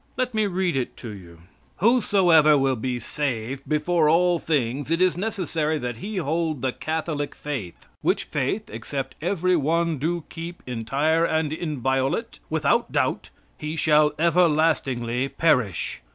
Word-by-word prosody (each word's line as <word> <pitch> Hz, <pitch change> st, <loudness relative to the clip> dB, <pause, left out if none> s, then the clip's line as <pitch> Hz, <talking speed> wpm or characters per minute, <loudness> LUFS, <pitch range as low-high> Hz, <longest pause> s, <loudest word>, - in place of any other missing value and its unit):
Let 255 Hz, -1 st, -1 dB
me 215 Hz, -1 st, +1 dB
read 185 Hz, -3 st, 0 dB
it 130 Hz, -2 st, -2 dB
to 120 Hz, -, -8 dB
you: 85 Hz, -5 st, -11 dB, 0.4 s
"Whosoever 180 Hz, -9 st, +5 dB
will 135 Hz, -1 st, +2 dB
be 125 Hz, +2 st, -2 dB
saved, 130 Hz, 0 st, -4 dB
before 155 Hz, +1 st, +2 dB
all 175 Hz, +1 st, +3 dB
things 140 Hz, -3 st, -1 dB
it 165 Hz, +1 st, +1 dB
is 185 Hz, -1 st, +3 dB
necessary 170 Hz, -6 st, -1 dB
that 125 Hz, -4 st, -4 dB
he 205 Hz, -, -5 dB
hold 160 Hz, -3 st, -1 dB
the 130 Hz, -, +1 dB
Catholic 155 Hz, 0 st, -3 dB
faith; 130 Hz, -13 st, -6 dB, 0.2 s
which -, -, +1 dB
faith, -, -, -2 dB
except 130 Hz, +5 st, -5 dB
every 180 Hz, +1 st, +1 dB
one 165 Hz, 0 st, +1 dB
do 170 Hz, +3 st, -1 dB
keep 170 Hz, +1 st, -8 dB
entire 135 Hz, +7 st, 0 dB
and 160 Hz, -2 st, 0 dB
inviolate, 135 Hz, -5 st, -1 dB
without -, -, +1 dB
doubt, -, -, 0 dB, 0.3 s
he 150 Hz, +1 st, -4 dB
shall 150 Hz, -1 st, +4 dB
everlastingly 150 Hz, -7 st, +2 dB
perish." 125 Hz, -, +1 dB
155 Hz, 140 wpm, -24 LUFS, 130-170 Hz, 0.4 s, Whosoever